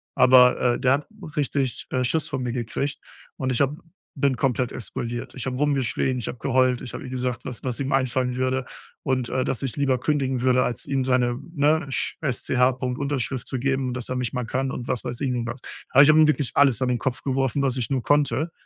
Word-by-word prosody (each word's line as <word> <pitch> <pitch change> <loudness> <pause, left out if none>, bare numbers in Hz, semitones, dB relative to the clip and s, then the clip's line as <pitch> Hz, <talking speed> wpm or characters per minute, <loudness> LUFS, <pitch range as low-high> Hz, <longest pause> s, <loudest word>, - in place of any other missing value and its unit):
aber, 125 -1 +5
äh - - -5
der 130 0 +3
hat 145 +1 -1 0.3
richtig, 140 -4 -1
äh, 130 - +1
Schiss 150 +5 0
vor 135 - -2
mir 125 -2 -2
gekriegt 125 +4 -3 0.4
und 130 -1 -1
ich 125 - +1
habe 140 +2 +1 0.4
bin 140 -2 +1
komplett 125 0 0
explodiert. 120 +1 -5
Ich 130 - -6
habe 130 -1 -2
rumgeschrien, 130 -2 0
ich 115 - -5
habe - - -5
geheult, 130 0 +2
ich 125 - -7
habe - - -6
ihm 130 - -7
gesagt, 125 -1 -3
was 125 -3 -6
was 125 -3 -3
ihm 135 0 -2
einfallen 130 -1 +1
würde 130 0 0 0.4
und, 130 -3 0
äh, 130 0 0
dass 130 - -2
ich 135 - -2
lieber 135 -3 +1
kündigen 135 -3 0
würde 125 -1 +4
als 120 - -3
ihm 135 -2 0
seine, 125 -1 +1 0.2
ne, 150 +1 +2
Sch 130 - -1
S 140 -6 -2
C 130 - -1
H 125 +1 +5
Punkt 125 0 -4
Unterschrift 135 -3 -2
zu 130 - -3
geben 135 0 0
und 125 - -3
dass 125 -2 -4
er 130 - -2
mich 125 -2 -2
mal 125 -2 -3
kann, 130 +3 -1
und 125 - -6
was 125 - -1
weiß 120 -1 -5
ich 135 -3 0
nicht 120 -1 -2
was. 120 +2 -6 0.3
Aber, 140 - +7
ich 145 - +5
habe 155 0 +6
ihm 155 - +7
wirklich 145 -3 +1
alles 140 -4 +4
an 125 - +1
den 125 -2 0
Kopf 130 -2 -3
geworfen 135 0 0
was 130 -2 +1
ich 120 -3 -2
nur 130 -3 -1
konnte 145 +3 +1
130 Hz, 245 wpm, -24 LUFS, 125-135 Hz, 0.4 s, Aber